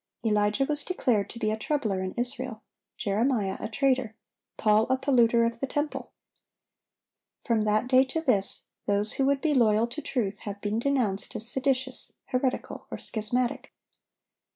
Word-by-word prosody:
Elijah 210 +4 +2
was 295 0 -2
declared 245 - 0
to - - -8
be 215 -2 0
a - - 0
troubler 220 -5 -1
in 185 0 -3
Israel, 240 -1 -3 0.3
Jeremiah 210 -1 0
a 215 - -4
traitor, 255 -2 +1 0.4
Paul 215 +1 +3
a 260 - +3
polluter 240 -4 +4
of 230 0 -2
the 270 - -2
temple. 295 +2 -3 1.3
From 230 -3 +2
that 215 +3 +2
day 255 0 +6
to 265 +5 -2
this, 210 -11 0 0.2
those 205 +1 +2
who 270 - +1
would 280 -1 +2
be 310 -2 +2
loyal 225 -4 +4
to 240 +6 -6
truth 205 -9 -2
have 205 -1 -6
been 210 +2 -1
denounced 240 -6 0
as 220 +1 -3
seditious, 260 0 -1
heretical, 255 0 -2
or - - -5
schismatic. 235 +3 -2
235 Hz, 155 wpm, -27 LUFS, 215-265 Hz, 1.3 s, day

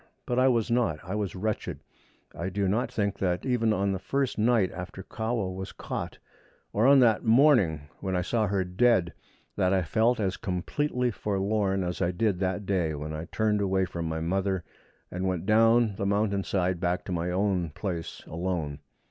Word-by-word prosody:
But 125 0 0
I 130 - +5
was 120 -2 +2
not; 115 -10 +2
I 95 +2 -5
was 105 -3 -2
wretched. 105 +3 -3 0.5
I 85 +2 -4
do 100 +1 -1
not 110 +6 0
think 100 -2 -1
that 90 -2 -1
even 120 -4 +2
on 100 -1 +1
the 95 - -2
first 135 +4 -1
night 110 -4 +3
after 90 +1 -7
Kahwa 110 -4 -2
was 95 0 -6
caught, - - -5 0.6
or 110 +5 +3
on 140 -1 +7
that 115 -3 +4
morning 115 - +4 0.2
when 95 -1 -2
I 90 - +1
saw 110 +2 0
her 100 -1 0
dead, 90 -1 +2 0.4
that 95 -2 +2
I 95 -1 +2
felt 110 +9 +2
as 95 -3 -1
completely 125 - -1
forlorn 100 -1 0
as 90 +1 -3
I 85 - +2
did 95 +1 0
that 95 +1 -1
day 90 -5 0
when 75 +1 -5
I 80 +1 -5
turned 105 0 0
away 95 -1 +1
from 85 -2 -4
my 80 0 -3
mother, 95 +2 0 0.5
and 90 +2 -2
went 90 -2 -2
down 115 0 +4
the 100 - -1
mountain 100 -1 +1
side 90 -2 0
back 90 0 -1
to - - -5
my 85 0 -1
own 90 -2 0
place 85 0 -5
alone. 85 -4 -3
95 Hz, 190 wpm, -28 LUFS, 90-110 Hz, 0.6 s, on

